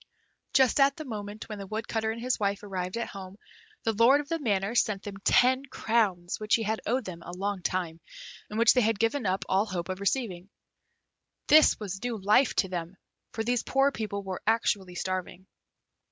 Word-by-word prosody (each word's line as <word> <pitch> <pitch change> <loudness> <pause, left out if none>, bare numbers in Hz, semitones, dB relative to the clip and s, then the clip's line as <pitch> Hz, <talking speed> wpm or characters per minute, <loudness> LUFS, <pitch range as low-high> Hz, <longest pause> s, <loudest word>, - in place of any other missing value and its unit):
Just 265 0 +4
at 275 0 +4
the 310 - -6
moment 210 -3 -6
that 215 -2 -7
the 195 - -7
Woodcutter 220 +1 -2
and 225 +1 -4
his 250 +1 -1
wife 200 -1 -1
arrived 185 0 -4
at 235 - -3
home, 190 0 -9 0.5
the 225 - +1
lord 235 +6 +5
of 295 -1 -6
the 330 - -1
manor 205 -5 0
sent 210 -4 +1
them 200 -1 -7
ten 255 +2 +4
crowns 210 -9 0
which 215 0 +2
he 225 - -1
had 220 +1 -2
owed 245 +2 0
them 170 -2 -7
a 175 - -9
long 195 +1 -3
time, 175 -2 -2 0.5
and 210 - -5
which 230 +1 +6
they 250 - +3
had 225 -1 +1
given 225 +2 0
up 185 +1 -1
all 195 +3 +2
hope 180 -2 -4
of 185 0 -4
receiving. 200 -3 -2 1.0
This 310 +1 +6
was 195 -1 -6
new 245 -2 -2
life 210 +6 +3
to 190 - +2
them, 180 0 -5 0.4
for 225 - -2
these 240 0 +1
poor 270 +1 +2
people 205 -5 -4
were 190 -1 -5
actually 200 -5 +1
starving. 185 0 -4
210 Hz, 195 wpm, -28 LUFS, 190-235 Hz, 1.0 s, which